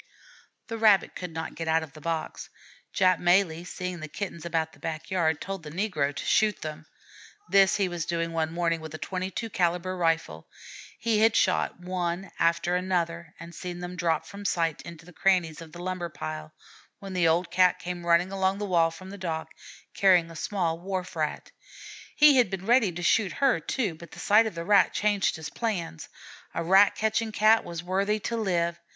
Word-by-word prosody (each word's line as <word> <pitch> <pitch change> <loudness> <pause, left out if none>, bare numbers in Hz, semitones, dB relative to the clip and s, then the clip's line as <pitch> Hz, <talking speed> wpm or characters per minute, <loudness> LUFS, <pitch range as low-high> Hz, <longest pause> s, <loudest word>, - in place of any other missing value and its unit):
The 225 0 -6
Rabbit 210 -4 +4
could 180 - -5
not 160 0 -5
get 165 +1 -6
out 160 0 +2
of 155 - -11
the 155 - -13
box. 165 0 -4 0.4
Jap 185 -2 +3
Malee, 175 -2 +2
seeing 180 0 -5
the 155 - -6
Kittens 170 -1 -6
about 160 -1 -1
the - - -18
back 160 +1 -6
yard, 160 -4 +1
told 195 -1 -5
the 155 - -9
negro 160 -5 -1
to - - -6
shoot 215 -1 +2
them. 155 0 -7 0.6
This 195 -1 +5
he 200 -2 +1
was 175 -3 -4
doing 165 -1 -2
one 160 -1 -1
morning 165 -1 0
with 160 0 -8
a - - -5
22 190 +6 -4
calibre 180 0 0
rifle. 165 - -1 0.5
He 225 -2 +1
had 220 0 +4
shot - - +1
one 180 0 -3
after 170 +1 +2
another 170 -3 -2
and 170 +1 -10
seen 175 +1 -6
them 180 0 -6
drop 165 -3 0
from 200 0 -10
sight 165 -5 0
into 170 -1 -11
the 180 - -14
crannies 175 -4 +1
of 165 -1 -11
the 175 +2 -9
lumber 185 -2 -3
pile, 80 - -6 0.5
when 195 -1 -8
the 180 -2 +2
old 170 +2 +1
Cat 180 0 +4
came 175 0 -6
running 170 +2 +3
along 190 0 0
the 205 - -3
wall 170 -4 +3
from 185 +3 -11
the 200 - -9
dock, 160 -3 -4 0.4
carrying 180 -4 +4
a - - -11
small 170 -1 -2
Wharf 185 0 -4
Rat. 155 -2 -3 0.6
He 295 -2 +7
had 245 -6 +4
been 190 0 -5
ready 235 -3 +4
to 175 +1 -6
shoot 195 +2 +2
her, 275 -9 +2
too, 205 - -2
but 165 +1 -12
the - - -10
sight 220 +2 +4
of 215 - -6
that 170 0 -5
Rat 205 +1 +4
changed 205 -2 +1
his 160 -2 -7
plans: 185 - -4 0.5
a - - -1
rat 195 +4 +5
catching 220 +1 0
Cat 215 +2 +4
was 170 -1 -6
worthy 195 +4 0
to 235 - -2
live. 170 -6 0
175 Hz, 200 wpm, -27 LUFS, 165-195 Hz, 0.6 s, He